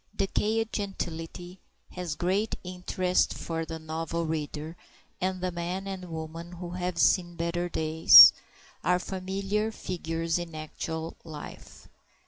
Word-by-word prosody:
DECAYED 220 +3 0
gentility 180 -2 -5 0.3
has 180 -4 -4
great 195 +6 0
interest 180 0 0
for 165 -1 -4
the 160 0 -6
novel 160 +1 -3
reader, 155 0 -4 0.5
and 185 0 -1
the 185 0 -1
man 175 +3 -4
and 190 -2 -6
woman 165 +2 -7
who 175 0 -7
"have 180 -1 -3
seen 175 +1 +3
better 170 +1 -2
days" 160 0 +9 0.5
are 180 0 +3
familiar 195 +4 -2
figures 165 -4 -3
in 170 -2 -7
actual 160 +1 -5
life. 155 -3 -10
175 Hz, 120 wpm, -28 LUFS, 165-185 Hz, 0.5 s, days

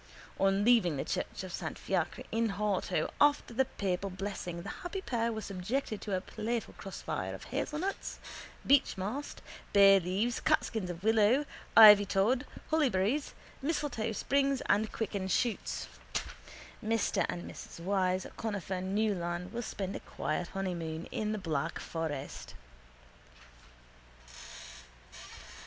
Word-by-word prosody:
On 195 +1 +3
leaving 215 - +4
the 135 - -2
church - - -3
of 185 -2 -7
Saint - - -4
Fiacre - - -1
in 225 -2 +1
Horto 200 -5 0
after 290 -4 +4
the 265 +3 +3
papal 195 -3 -2
blessing 185 -2 -5
the - - -6
happy 355 +2 -4
pair 235 -10 -1
were 220 -1 -4
subjected 210 +4 -3
to 200 -3 -2
a - - -3
playful 230 +4 -3
crossfire 195 -2 -4
of - - -10
hazelnuts, 360 +6 -3 0.5
beechmast, 270 -1 +1 0.3
bayleaves, 195 +3 +5
catkins 205 -5 +1
of 175 +1 -6
willow, 225 +6 +4 0.3
ivytod, 210 +4 +8 0.3
hollyberries, 275 -3 +2 0.3
mistletoe 275 -7 -1
sprigs 275 +3 +1
and 210 +2 +1
quicken 200 -4 -2
shoots. 230 +4 -1 1.0
Mr 225 -1 +1
and 175 - -3
Mrs - - -9
Wyse 185 0 +1
Conifer 195 -4 -3
Neaulan 185 -3 -1
will 235 +1 -3
spend 195 -4 -4
a - - -3
quiet 160 +3 -3
honeymoon 170 -4 -3
in 215 0 -1
the 215 - -1
Black 165 -4 -2
Forest. 150 -4 -5
205 Hz, 120 wpm, -32 LUFS, 185-230 Hz, 1.0 s, ivytod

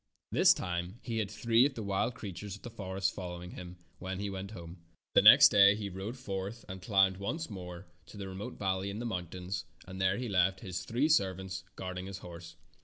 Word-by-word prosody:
This - - +6
time 90 +3 -3
he 115 -2 -2
had 105 -3 -1
three 115 +3 +3
of 140 - -10
the 110 - -4
wild 100 +4 0
creatures 100 -1 -6
of 105 - -15
the 120 - -7
forest 95 -3 -2
following 90 -1 -7
him 90 0 -9 0.2
when 95 0 -4
he 100 0 -3
went 95 0 -5
home. 85 -4 -10 0.3
The - - +7
next - - +10
day 100 0 +7
he 105 -1 -4
rode 95 +7 -6
forth 100 -1 -5
and 95 0 -7
climbed 95 -2 +3
once 145 - -4
more 90 -1 -8 0.2
to - - -12
the 100 -1 -5
remote 95 +2 -7
valley 95 0 -1
in 100 - -5
the 120 - -4
moun 90 -6 -3
tains, 90 +2 -5 0.2
and 95 0 -7
there 95 +1 +2
he 125 0 -3
left 95 -1 +2
his 95 -4 -5
three 125 +6 +1
servants 95 - 0
guarding 95 0 -5
his 95 -1 -6
horse. 85 -2 -10
95 Hz, 215 wpm, -32 LUFS, 90-105 Hz, 0.3 s, next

